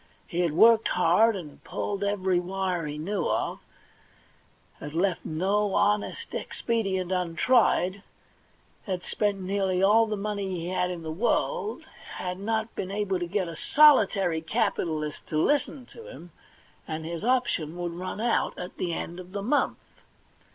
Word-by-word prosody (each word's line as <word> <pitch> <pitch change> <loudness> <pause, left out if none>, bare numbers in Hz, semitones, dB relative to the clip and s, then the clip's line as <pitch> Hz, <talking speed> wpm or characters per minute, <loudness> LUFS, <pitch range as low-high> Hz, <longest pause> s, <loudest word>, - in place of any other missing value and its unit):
He 170 - -4
had 170 -4 +1
worked 225 +6 +6
hard, 180 +6 +3
had 160 -7 -9
pulled 200 -1 -3
every 190 -3 +1
wire 180 -2 -2
he 150 0 -5
knew 180 +3 -2
of, - - -1 1.2
had 150 +1 -8
left 180 0 +1
no 195 +5 0
honest 205 0 0
expedient 195 -6 -2
untried, 185 +2 +2 0.9
had 185 -2 -2
spent 205 -2 -1
nearly 190 -1 0
all 220 +3 +5
the 215 -1 -2
money 200 -1 -3
he 175 -2 -4
had 180 -1 0
in 175 -2 -5
the 160 - -4
world, 420 - -1 0.3
had 180 0 -4
not 220 +2 -2
been 185 - -4
able 200 -2 -1
to 175 - -3
get 190 0 -1
a 165 - -6
solitary 200 - +4
capitalist 155 -2 -2
to 155 - -2
listen 275 - +1
to 460 +1 -12
him, 175 - -11 0.6
and 160 0 -4
his 170 +2 -5
option 230 -10 0
would 175 -1 -3
run 180 +4 -5
out 235 +1 0
at 180 +1 -7
the 175 -2 -2
end 175 +2 -5
of 185 +1 -11
the 200 -1 -3
month. 280 +7 +1
190 Hz, 155 wpm, -27 LUFS, 175-210 Hz, 1.2 s, worked